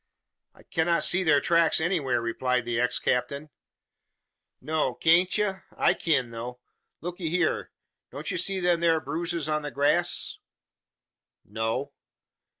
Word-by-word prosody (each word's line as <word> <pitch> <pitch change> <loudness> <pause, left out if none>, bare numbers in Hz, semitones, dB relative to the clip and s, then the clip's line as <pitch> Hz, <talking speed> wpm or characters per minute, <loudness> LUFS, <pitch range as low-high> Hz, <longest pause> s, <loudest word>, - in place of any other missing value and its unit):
"I - - -19
cannot 170 0 0
see 185 +2 +4
their 150 -4 +4
tracks 170 +2 +3
anywhere," 160 -8 0
replied 125 +1 -1
the 120 -1 -1
ex 125 0 +1
captain. 140 +4 -2 1.1
"No, 150 -2 -1
kan't 175 +4 +3
ye? 210 -1 +1 0.3
I - - +3
kin 135 -8 0
though. 120 +2 -7 0.4
Lookee 175 -1 -4
hyur! 175 0 0 0.4
Don't 145 +2 -6
ye - - -2
see 190 +2 +1
them 175 -2 +1
thur 165 -1 +3
bruises 170 -1 -3
on 155 0 0
the 145 - -5
grass?" 145 +1 +1 1.1
"No." 115 +6 -3
155 Hz, 135 wpm, -26 LUFS, 130-170 Hz, 1.1 s, see